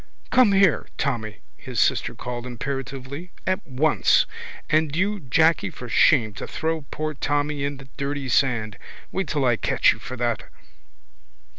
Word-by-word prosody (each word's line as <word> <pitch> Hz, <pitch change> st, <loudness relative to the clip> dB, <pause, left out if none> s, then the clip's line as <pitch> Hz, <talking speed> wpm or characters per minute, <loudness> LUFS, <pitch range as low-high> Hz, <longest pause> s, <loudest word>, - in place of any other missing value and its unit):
—Come 250 Hz, -6 st, +5 dB
here, 195 Hz, -5 st, +4 dB
Tommy, 110 Hz, -7 st, -2 dB, 0.2 s
his -, -, -5 dB
sister -, -, +2 dB
called 120 Hz, 0 st, -5 dB
imperatively. 135 Hz, +5 st, -5 dB, 0.2 s
At 185 Hz, -2 st, -1 dB
once! 145 Hz, +3 st, +3 dB, 0.4 s
And 155 Hz, -1 st, +1 dB
you, 205 Hz, +4 st, 0 dB
Jacky, 160 Hz, -, +2 dB
for 125 Hz, -, -9 dB
shame 115 Hz, -2 st, +4 dB
to -, -, -4 dB
throw 160 Hz, 0 st, -2 dB
poor 155 Hz, 0 st, -3 dB
Tommy 145 Hz, 0 st, -1 dB
in 140 Hz, 0 st, -2 dB
the 135 Hz, 0 st, -13 dB
dirty 140 Hz, 0 st, -3 dB
sand. 115 Hz, -6 st, +1 dB, 0.3 s
Wait 190 Hz, 0 st, -2 dB
till 145 Hz, -4 st, 0 dB
I 120 Hz, -2 st, +3 dB
catch -, -, +3 dB
you -, -, -12 dB
for 130 Hz, -, -7 dB
that. 120 Hz, -1 st, 0 dB
140 Hz, 150 wpm, -24 LUFS, 125-160 Hz, 0.4 s, Come